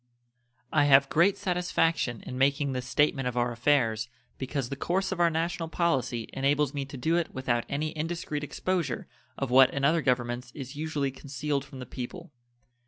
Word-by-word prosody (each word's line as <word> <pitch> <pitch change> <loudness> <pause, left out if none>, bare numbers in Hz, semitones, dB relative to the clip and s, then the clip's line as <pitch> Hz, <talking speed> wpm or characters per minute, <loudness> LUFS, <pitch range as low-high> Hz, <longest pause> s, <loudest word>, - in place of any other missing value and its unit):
I 145 -2 +4
have 135 -1 +6
great 175 +5 +3
satisfaction 165 - 0
in - - -6
making 140 +2 +2
this 125 -1 -4
statement 135 -1 +2
of 125 0 -3
our 120 0 +1
affairs, 120 -3 +1 0.3
because 135 -2 -3
the 140 - -3
course 190 +7 -1
of 190 - -3
our 170 -1 +5
national 165 0 -2
policy 130 -9 0
enables 140 +1 +1
me 140 -1 -3
to 140 0 -9
do 160 +7 +1
it 170 - -2
without 120 -3 0
any 150 +2 -1
indiscreet 155 -2 -3
exposure 165 -3 -2 0.3
of 135 -3 -2
what 130 +1 +7
in 140 0 0
other 160 +3 +3
governments 125 -1 -1
is 135 -1 -7
usually 150 -2 -2
concealed 140 +1 -3
from 140 -1 -12
the 130 - -6
people. 165 +9 -7
140 Hz, 175 wpm, -28 LUFS, 130-160 Hz, 0.3 s, what